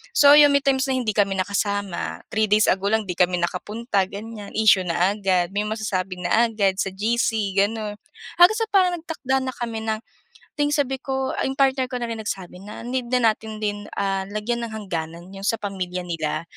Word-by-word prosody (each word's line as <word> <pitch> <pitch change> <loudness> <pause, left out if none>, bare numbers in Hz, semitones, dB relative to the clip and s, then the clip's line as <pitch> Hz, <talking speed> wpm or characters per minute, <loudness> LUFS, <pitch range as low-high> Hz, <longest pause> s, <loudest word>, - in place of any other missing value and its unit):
So, 285 -6 +7
'yon 295 -1 +8
may - - +5
times 270 0 +2
na 265 - 0
hindi 245 -4 0
kami 195 -2 +2
nakasama, 200 -1 -2
3 220 0 +1
days 210 +1 +4
ago 195 +1 0
lang, 220 0 +2
'di 180 - -3
kami 180 0 +3
nakapunta 205 +4 -1
ganyan, 210 +1 -8
issue 210 -4 +5
na 175 +3 +2
agad. 185 -3 +1
May 210 - +1
masasabi 195 -4 -2
na 230 +6 +3
agad 200 -3 +1
sa - - -4
GC 215 0 0
gano'n. 210 +1 0 0.4
Hanggang 360 +6 +6
sa 450 - 0
parang 370 -3 +3
nagtakda 270 -5 -2
na 260 -1 -3
kami 230 -2 -4
ng 220 0 0 0.6
ding 290 0 +2
sabi 270 -2 0
ko, 265 -1 -2
'yong 265 0 -1
partner 265 -1 +3
ko 255 - -5
na 235 - -3
rin 225 - -4
nagsabi 190 -4 -5
na 210 +1 -9
need 250 0 -2
na 235 -3 +5
natin 220 0 -9
din, 205 0 -2
ah, 195 -1 -1
lagyan 215 +3 -2
ng 220 - -10
hangganan 170 -4 -5
'yong 195 0 -7
sa 225 - +3
pamilya 185 -3 -3
nila. 160 -2 -2
215 Hz, 200 wpm, -23 LUFS, 195-245 Hz, 0.6 s, yon